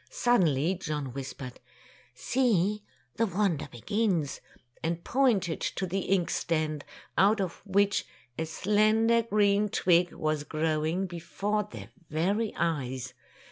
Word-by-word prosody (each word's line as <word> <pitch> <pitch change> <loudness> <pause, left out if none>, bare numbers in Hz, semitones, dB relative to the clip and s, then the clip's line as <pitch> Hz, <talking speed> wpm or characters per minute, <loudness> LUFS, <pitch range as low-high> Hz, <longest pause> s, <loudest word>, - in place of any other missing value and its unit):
Suddenly 175 - +2
John 150 -6 -3
whispered, 135 -1 -7 0.6
"See, 210 - +1 0.4
the 230 - +2
wonder 190 -5 0
begins!'' 185 - -1 0.4
and 170 +1 -2
pointed 215 -11 +1
to 190 - -2
the 190 +2 -1
ink 185 -2 +1
stand, 155 -3 -1 0.4
out 205 +3 +5
of 185 -3 -3
which 200 +1 +2 0.3
a 160 +3 -3
slender 215 +6 +3
green 210 -2 +2
twig 175 -2 +3
was 155 -1 -1
growing 160 +4 0
before 195 +4 -2
their - - -9 0.2
very 200 +8 0
eyes. 130 -6 -2
180 Hz, 115 wpm, -29 LUFS, 155-210 Hz, 0.6 s, out